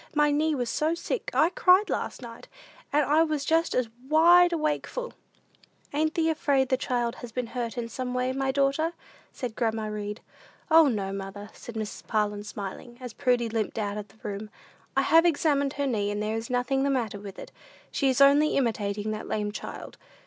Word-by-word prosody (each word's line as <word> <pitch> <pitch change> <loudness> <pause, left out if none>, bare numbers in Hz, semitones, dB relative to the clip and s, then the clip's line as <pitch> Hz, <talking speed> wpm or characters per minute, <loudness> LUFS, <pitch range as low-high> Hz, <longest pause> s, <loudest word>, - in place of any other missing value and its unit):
My 295 0 +4
knee 305 +1 +1
was 245 -3 -2
so 315 +2 +1
sick, 395 - -3
I 330 - +3
cried 370 +3 +5
last - - -3
night, 230 -1 -10 0.4
and 295 0 +3
I 300 +4 +4
was 305 -3 0
just 325 +2 +2
as 250 -2 +1 0.2
wide 345 +3 +6
awakeful!" 330 +10 -2 0.8
"Ain't 310 +2 0
thee 325 -1 +2
afraid 280 -4 +1
the 260 - +3
child 240 -2 -1
has 245 -2 -9
been 250 +2 -2
hurt 235 0 -4
in 235 -1 -2
some 250 +1 -4
way, 250 +1 0
my 270 0 0
daughter?" 280 +4 +1 0.4
said 240 -4 -5
grandma 225 -2 -1
Read. 210 0 -4 0.5
"O, 320 -1 +8
no, 200 -6 -1
mother," 195 +1 -7
said 235 - -10
Mrs. 215 -1 -5
Parlin, 210 -1 0
smiling, 210 +4 -7
as 250 -3 -7
Prudy 245 -3 +1
limped 225 -1 -2
out 205 -2 -2
of 210 -1 -6
the 205 +2 -23
room. 210 +1 -5 0.5
"I - - +4
have 330 +1 +6
examined 285 -4 +2
her 285 - -2
knee, 210 -6 0
and 205 0 -2
there 215 +1 -1
is 225 0 -4
nothing 250 +2 0
the 280 - +1
matter 235 -7 -1
with 200 -1 -9
it. - - -9 0.4
She 275 - +1
is 260 +1 +1
only 285 +2 +5
imitating 215 -4 -1
that 215 0 -5
lame 210 -1 -2
child. - - -8
250 Hz, 195 wpm, -27 LUFS, 215-295 Hz, 0.8 s, O